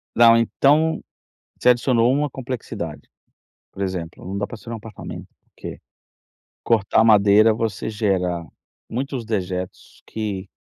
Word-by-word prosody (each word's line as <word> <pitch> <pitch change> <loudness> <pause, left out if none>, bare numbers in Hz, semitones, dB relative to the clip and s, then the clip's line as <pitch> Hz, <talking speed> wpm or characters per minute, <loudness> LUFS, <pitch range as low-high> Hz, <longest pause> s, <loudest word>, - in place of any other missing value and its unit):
Não, 115 0 +7
então 145 +7 +3 0.6
você 125 - +4
adicionou 120 -1 +3
uma 145 +2 +1
complexidade. 130 -2 -6 0.6
Por 100 - -8
exemplo, 90 -4 -5
não 95 +2 -4
dá 105 - -1
para - - -8
ser 115 - -12
em - - -4
um - - -3
apartamento, 110 -2 -9 0.2
porque - - -9 0.8
cortar 110 -1 +3
madeira, 105 0 +6
você 110 -2 -3
gera 95 -6 -1 0.4
muitos 130 0 -3
dejetos 95 -4 -4
que 100 -3 -4
110 Hz, 130 wpm, -22 LUFS, 100-120 Hz, 0.8 s, Não